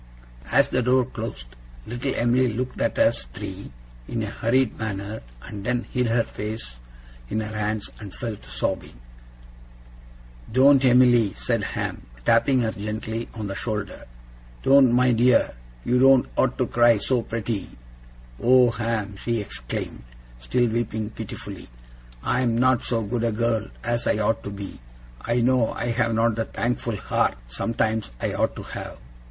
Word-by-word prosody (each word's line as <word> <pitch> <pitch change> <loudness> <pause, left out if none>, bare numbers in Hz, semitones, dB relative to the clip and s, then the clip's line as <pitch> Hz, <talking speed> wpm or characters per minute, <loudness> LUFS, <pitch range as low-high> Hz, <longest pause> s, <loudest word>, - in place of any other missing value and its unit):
As 140 0 +4
the 125 - +1
door 125 +1 +3
closed, 115 - -6 0.4
little 120 +4 -3
Em'ly 125 +2 +3
looked 125 +3 -3
at - - 0
us - - +3
three - - -8 0.4
in 115 -2 -2
a 105 - -4
hurried 125 +1 +1
manner 105 0 -4 0.2
and 100 -1 -7
then 120 +1 0
hid 125 -1 +1
her 115 0 +2
face 105 - -6 0.5
in 110 - -1
her 110 0 -4
hands, 105 0 -2
and 105 -3 -8
fell 115 0 -2
to - - -16
sobbing. - - -3 1.5
'Doen't, 135 +3 +6
Em'ly!' 120 -4 +5
said - - 0
Ham, - - -4 0.2
tapping 130 -2 +4
her 110 -2 0
gently 110 +2 -4
on 110 -2 -4
the 100 - -3
shoulder. 105 -1 -4 0.6
'Doen't, 135 -2 +6
my 125 +1 +4
dear! 120 +1 +4 0.3
You 125 +1 +3
doen't 135 -1 +6
ought 130 -1 +1
to 125 - +2
cry 120 -1 +4
so, 125 +4 +1
pretty!' 115 -3 -3 0.7
'Oh, 125 0 +6
Ham!' 115 -4 -2
she 115 +2 -1
exclaimed, 60 - -5 0.4
still 120 - +1
weeping 110 -1 -2
pitifully, - - -8 0.5
'I 125 - +1
am 120 -2 +1
not 130 0 +3
so 115 -2 0
good 115 +3 -2
a 115 - +2
girl 115 0 0 0.2
as 120 0 -1
I - - +2
ought 110 0 0
to - - -3
be! 100 -1 -7 0.4
I 120 - 0
know 125 -1 +3
I 120 +1 -2
have 115 -1 +1
not 115 +1 +3
the 115 - 0
thankful 120 0 -2
heart, - - 0
sometimes, 110 - -1
I - - -1
ought - - 0
to - - -7
have! - - -7
115 Hz, 160 wpm, -24 LUFS, 110-125 Hz, 1.5 s, Doen't